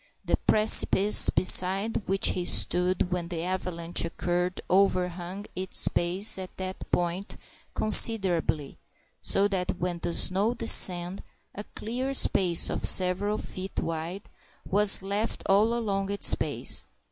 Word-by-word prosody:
The -, -, -1 dB
precipice 210 Hz, -1 st, +5 dB
beside 195 Hz, +5 st, +3 dB
which 195 Hz, +1 st, 0 dB
he 180 Hz, -, -4 dB
stood 180 Hz, +1 st, 0 dB
when 175 Hz, -1 st, -4 dB
the 170 Hz, -2 st, -6 dB
avalanche 175 Hz, -2 st, -5 dB
occurred 175 Hz, +2 st, -4 dB
overhung 185 Hz, 0 st, -2 dB
its 185 Hz, 0 st, 0 dB
base 185 Hz, +4 st, -3 dB
at 185 Hz, -1 st, -11 dB
that 185 Hz, 0 st, -8 dB
point 175 Hz, +3 st, -4 dB, 0.4 s
considerably, 190 Hz, -9 st, +2 dB, 0.4 s
so 200 Hz, +1 st, +1 dB
that 185 Hz, -2 st, -4 dB
when 175 Hz, -1 st, -5 dB
the 170 Hz, -, -5 dB
snow 200 Hz, +6 st, 0 dB
descended 180 Hz, -5 st, +3 dB, 0.3 s
a 205 Hz, -, -10 dB
clear 255 Hz, +5 st, -5 dB
space 180 Hz, -8 st, +2 dB
of -, -, -6 dB
several 185 Hz, +3 st, +2 dB
feet 190 Hz, +1 st, -8 dB
wide 165 Hz, +4 st, -6 dB, 0.4 s
was 200 Hz, 0 st, +1 dB
left 205 Hz, +3 st, -4 dB
all 205 Hz, +3 st, +1 dB
along 200 Hz, -4 st, -4 dB
its 200 Hz, 0 st, +1 dB
base. -, -, 0 dB
185 Hz, 125 wpm, -25 LUFS, 180-200 Hz, 0.4 s, precipice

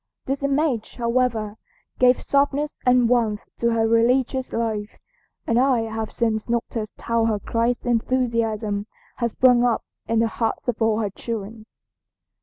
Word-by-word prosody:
This 270 Hz, +1 st, -2 dB
image, 280 Hz, -4 st, 0 dB
however, 235 Hz, -3 st, 0 dB, 0.4 s
gave 250 Hz, 0 st, +4 dB
softness 285 Hz, +1 st, 0 dB
and 250 Hz, -1 st, +5 dB
warmth 230 Hz, -4 st, +1 dB, 0.2 s
to 235 Hz, -, +2 dB
her 225 Hz, -1 st, +2 dB
religious 250 Hz, +3 st, +2 dB
life, 220 Hz, -2 st, -3 dB, 0.5 s
and 230 Hz, +1 st, +2 dB
I 255 Hz, -2 st, +3 dB
have 220 Hz, -1 st, -4 dB
since 225 Hz, -1 st, -1 dB
noticed 230 Hz, -2 st, -3 dB
how 230 Hz, -1 st, +1 dB
her 220 Hz, -2 st, +1 dB
Christ 230 Hz, +3 st, -1 dB
enthusiasm 230 Hz, -4 st, 0 dB, 0.3 s
has 235 Hz, -2 st, -1 dB
sprung 250 Hz, -2 st, +5 dB
up 240 Hz, -2 st, +1 dB, 0.2 s
in 230 Hz, -, +1 dB
the 225 Hz, +1 st, +3 dB
hearts 225 Hz, +2 st, -3 dB
of 240 Hz, -1 st, -2 dB
all 220 Hz, -1 st, +3 dB
her 205 Hz, -2 st, -2 dB
children." 220 Hz, +1 st, -6 dB
230 Hz, 145 wpm, -23 LUFS, 220-250 Hz, 0.5 s, and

